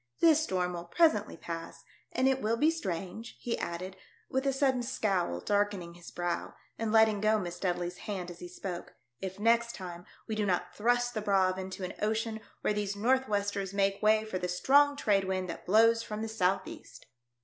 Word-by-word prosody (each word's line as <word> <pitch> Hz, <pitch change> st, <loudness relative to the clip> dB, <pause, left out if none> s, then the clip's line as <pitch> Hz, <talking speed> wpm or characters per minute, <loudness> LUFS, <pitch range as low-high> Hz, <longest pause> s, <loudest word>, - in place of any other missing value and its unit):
'* -, -, -42 dB
This 320 Hz, -2 st, +6 dB
storm 180 Hz, -9 st, -1 dB
will 170 Hz, 0 st, -5 dB
presently 210 Hz, -, +2 dB
pass, 165 Hz, 0 st, -7 dB, 0.3 s
and 255 Hz, +2 st, +2 dB
it 265 Hz, 0 st, +2 dB
will 225 Hz, +2 st, +1 dB
be 305 Hz, +6 st, +4 dB
strange," 195 Hz, -, -5 dB
he 235 Hz, -, -2 dB
added, 180 Hz, +2 st, -4 dB, 0.4 s
with 265 Hz, +1 st, 0 dB
a -, -, +4 dB
sudden 265 Hz, -2 st, +2 dB
scowl 195 Hz, -, -1 dB
darkening 200 Hz, -, 0 dB
his 175 Hz, 0 st, -12 dB
brow, 175 Hz, -1 st, -3 dB, 0.2 s
and 225 Hz, -1 st, -1 dB
letting 220 Hz, -2 st, +5 dB
go 215 Hz, +1 st, +4 dB
Miss 175 Hz, -4 st, -4 dB
Dudley's 175 Hz, -1 st, -2 dB
hand 185 Hz, -4 st, -5 dB
as 170 Hz, -, -12 dB
he 175 Hz, -, -7 dB
spoke, 180 Hz, 0 st, -7 dB, 0.2 s
"if 190 Hz, 0 st, -6 dB
next 235 Hz, +2 st, +3 dB
time 175 Hz, -2 st, -8 dB, 0.2 s
we 220 Hz, -, -3 dB
do 215 Hz, -1 st, 0 dB
not 185 Hz, -3 st, 0 dB
thrust 245 Hz, +2 st, +1 dB
the 215 Hz, -, -2 dB
Braave 190 Hz, -2 st, +2 dB
into 190 Hz, 0 st, -6 dB
an 180 Hz, -, -4 dB
ocean 220 Hz, +1 st, 0 dB, 0.2 s
where -, -, +1 dB
these 205 Hz, -1 st, -2 dB
north 260 Hz, +5 st, +2 dB
westers 200 Hz, -1 st, -1 dB
make 195 Hz, 0 st, +1 dB
way 215 Hz, 0 st, +4 dB
for 190 Hz, -4 st, -3 dB
the 180 Hz, -, -2 dB
strong 285 Hz, +11 st, +4 dB
trade 200 Hz, -7 st, +2 dB
wind 185 Hz, -1 st, -1 dB
that -, -, -10 dB
blows 230 Hz, +4 st, +5 dB
from 215 Hz, -1 st, -5 dB
the -, -, -2 dB
south 195 Hz, -4 st, +1 dB
east." -, -, -11 dB
205 Hz, 200 wpm, -31 LUFS, 185-230 Hz, 0.4 s, This